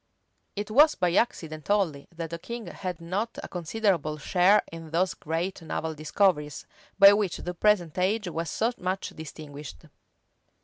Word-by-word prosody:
It 205 +1 -4
was 300 +7 +6
by 175 -1 +1
accident 160 -8 -1
only 180 -9 +1
that 165 -1 -5
the 170 - -5
king 235 +4 -6
had 180 -3 -5
not 195 +7 -3
a - - -5
considerable 175 -3 -1
share 185 +6 +4
in 165 -1 -9
those 180 +4 +1
great 165 +4 -3
naval 160 0 -3
discoveries, 150 0 0 0.3
by 200 0 +9
which 205 -4 0
the 180 - -5
present 175 -4 +2
age 205 +3 +1
was 165 -1 -3
so 225 +8 0
much 185 +1 -2
distinguished. 145 - -10
175 Hz, 150 wpm, -27 LUFS, 160-200 Hz, 0.3 s, by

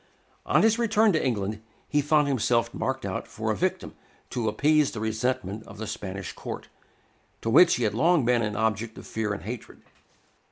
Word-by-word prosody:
On - - +4
his 225 +1 +3
return 220 -2 +3
to 155 - +1
England, 105 -4 -1 0.3
he 145 - +2
found 150 0 +3
himself 115 -2 +1
marked 130 -2 -2
out 95 -1 -4
for - - -3
a - - 0
victim - - -2 0.4
to 115 -3 -1
appease 150 +6 +3
the 115 - -6
resentment 110 -2 -2
of 100 - -11
the 110 - -5
Spanish 100 -3 -5
Court, - - -7 0.7
to 115 - 0
which 180 - +7
he 125 - -2
had 105 - +1
long 160 +4 +3
been 120 -1 +3
an 105 -2 -2
object 110 +1 -1
of - - -10
fear 110 -2 -2
and 100 - -4
hatred. 115 +3 -8
115 Hz, 190 wpm, -26 LUFS, 105-145 Hz, 0.7 s, which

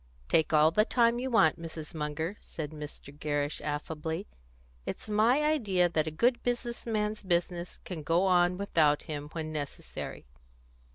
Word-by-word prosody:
"Take 160 - +3
all 155 0 +6
the 210 +6 +4
time 235 +1 +3
you 260 +1 -2
want, 165 - +4
Mrs. 160 -1 -7
Munger," 160 +4 -3
said 155 -2 -6
Mr. 150 -2 -9
Gerrish 145 0 -2
affably. 160 +4 -3 0.6
"It's - - -6
my 225 +7 +3
idea 205 - +2
that 160 -2 0
a - - +1
good 235 +11 +2
business 240 -1 -2
man's 215 -1 -1
business 175 -2 -1
can 175 -4 -5
go 165 +5 +2
on 180 -1 +4
without 160 -7 +2
him, 150 -2 -5
when 160 -1 -4
necessary." 145 - -6
170 Hz, 155 wpm, -30 LUFS, 155-210 Hz, 0.6 s, all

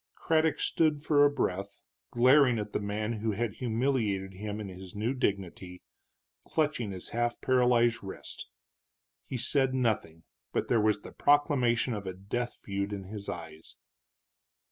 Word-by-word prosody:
Craddock 160 -1 +1
stood 155 -3 +1
for 145 -2 +4
a 145 - +6
breath 100 -7 -3 0.3
glaring 125 0 +5
at 105 -1 -4
the - - 0
man 105 +2 -2
who 110 -1 0
had 110 0 -2
humiliated 110 -6 0
him 105 +2 -5
in 105 - -5
his 95 0 -10
new 110 +5 0
dignity, 95 -6 -3 0.6
clutching 145 -9 0
his 95 -1 -7
half 120 0 -1
paralyzed 125 -2 +3
wrist. 95 - -8 0.8
He 130 - -3
said 130 +2 +1
nothing, 105 -10 -1 0.3
but - - -1
there 115 -3 +4
was 105 -1 +1
the - - -9
proclamation 130 -5 +2
of 100 -2 -5
a 95 - -3
death 120 +6 -4
feud 100 0 -2
in 100 -1 -5
his 100 +1 -7
eyes. 80 -2 -8
110 Hz, 150 wpm, -30 LUFS, 100-130 Hz, 0.8 s, a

